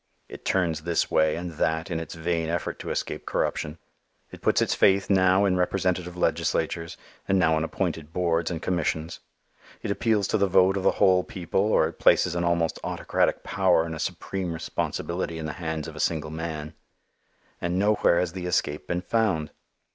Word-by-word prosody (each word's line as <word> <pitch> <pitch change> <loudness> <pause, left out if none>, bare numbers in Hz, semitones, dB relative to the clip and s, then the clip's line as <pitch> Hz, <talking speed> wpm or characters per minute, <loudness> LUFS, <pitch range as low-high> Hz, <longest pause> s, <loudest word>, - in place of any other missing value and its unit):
It - - -11
turns 85 -5 +1
this 85 +1 0
way 80 0 +3
and 85 +1 -5
that 80 +3 0
in 80 - -1
its 80 - -7
vain 85 0 -1
effort 85 0 -3
to - - -6
escape - - -3
corruption. 75 +2 -1 0.5
It - - -11
puts - - +3
its - - +1
faith 95 +1 +3
now 95 +1 +4
in 90 -2 +2
representative 90 -1 -1
legislatures, 85 -1 -1 0.3
and 95 - +3
now 80 -4 +3
in 80 - 0
appointed 80 -2 -3
boards 85 -1 0
and 85 -2 -4
commissions; 85 -2 -1 0.6
it - - -1
appeals 105 -2 +1
to - - +1
the 100 - +3
vote 95 +1 +4
of 100 - -1
the - - +3
whole 90 -1 +4
people 90 +1 -2
or 80 - +4
it 80 - -10
places 90 - +4
an 85 0 -1
almost 85 -1 +1
autocratic - - 0
power 90 -4 +2
and 80 - -5
a 80 - -6
supreme 95 +1 -3
responsibility 85 +1 -3
in 80 - -5
the 75 - -4
hands 80 -2 -3
of - - -9
a - - -8
single 80 -2 -1
man. 80 -1 -5 0.9
And 85 +1 -1
nowhere 100 -3 +3
has 90 -2 -1
the 90 -1 -4
escape 75 -4 -1
been 90 +1 -1
found. 95 -9 0
85 Hz, 185 wpm, -26 LUFS, 80-95 Hz, 0.9 s, now